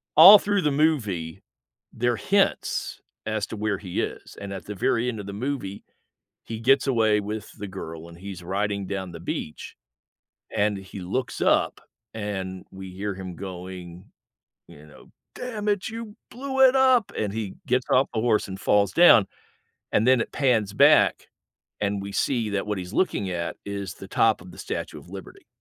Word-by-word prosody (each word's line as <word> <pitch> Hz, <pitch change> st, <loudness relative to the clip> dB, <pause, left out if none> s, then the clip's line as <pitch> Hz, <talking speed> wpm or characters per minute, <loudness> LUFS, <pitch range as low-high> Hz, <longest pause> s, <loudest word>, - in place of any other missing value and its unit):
all 190 Hz, +7 st, +11 dB
through 205 Hz, -1 st, 0 dB
the 150 Hz, -2 st, +1 dB
movie, 110 Hz, -, 0 dB, 0.5 s
there 120 Hz, +1 st, 0 dB
are -, -, -1 dB
hints 195 Hz, 0 st, 0 dB, 0.3 s
as 110 Hz, -1 st, -1 dB
to -, -, -6 dB
where 105 Hz, -1 st, -1 dB
he 90 Hz, -2 st, -3 dB
is, -, -, -6 dB
and 100 Hz, -1 st, -7 dB
at 95 Hz, -, -7 dB
the 105 Hz, -, -6 dB
very 115 Hz, +5 st, +1 dB
end 110 Hz, -3 st, -5 dB
of 100 Hz, -, -6 dB
the 100 Hz, -, -6 dB
movie, 115 Hz, -4 st, -4 dB, 0.6 s
he 110 Hz, -1 st, -6 dB
gets 135 Hz, +4 st, +4 dB
away 110 Hz, -5 st, +3 dB
with 105 Hz, +1 st, -5 dB
the 105 Hz, -, -6 dB
girl, 80 Hz, -3 st, -8 dB
and 85 Hz, 0 st, -13 dB
he's 95 Hz, -2 st, -8 dB
riding 100 Hz, +1 st, -2 dB
down 95 Hz, -2 st, -4 dB
the 85 Hz, -, -9 dB
beach, 75 Hz, -2 st, -5 dB, 0.8 s
and 105 Hz, 0 st, +1 dB
he 95 Hz, 0 st, -9 dB
looks 110 Hz, +8 st, -3 dB
up, -, -, +2 dB, 0.3 s
and 95 Hz, -4 st, -4 dB
we 95 Hz, 0 st, -9 dB
hear 100 Hz, +2 st, -4 dB
him 95 Hz, -1 st, -7 dB
going, 90 Hz, -1 st, -8 dB, 0.6 s
you 75 Hz, +1 st, -14 dB
know, 75 Hz, -, -16 dB, 0.3 s
"Damn 220 Hz, -4 st, -4 dB
it, 205 Hz, -2 st, 0 dB
you 225 Hz, -1 st, -7 dB
blew 265 Hz, +2 st, -4 dB
it 260 Hz, -, +2 dB
up!" 255 Hz, -6 st, +4 dB
And 105 Hz, -2 st, -1 dB
he 110 Hz, -3 st, -4 dB
gets 125 Hz, 0 st, +1 dB
off 130 Hz, +1 st, +4 dB
the 110 Hz, -, -1 dB
horse 115 Hz, -2 st, +2 dB
and 95 Hz, 0 st, -7 dB
falls 100 Hz, -1 st, +3 dB
down, 165 Hz, -, +7 dB, 0.7 s
and 110 Hz, -, +3 dB
then 130 Hz, -2 st, +5 dB
it -, -, -2 dB
pans 115 Hz, -8 st, +1 dB
back, -, -, +5 dB, 0.5 s
and 100 Hz, -1 st, -1 dB
we 100 Hz, 0 st, -6 dB
see 115 Hz, -3 st, 0 dB
that 100 Hz, 0 st, -2 dB
what 105 Hz, -2 st, -2 dB
he's 90 Hz, +1 st, -7 dB
looking 100 Hz, -, 0 dB
at 85 Hz, -1 st, -3 dB
is 100 Hz, -2 st, -5 dB
the 95 Hz, -, -11 dB
top 115 Hz, +2 st, +3 dB
of 90 Hz, -, -12 dB
the -, -, -14 dB
Statue -, -, -5 dB
of -, -, -15 dB
Liberty. -, -, -10 dB
105 Hz, 185 wpm, -25 LUFS, 95-130 Hz, 0.8 s, all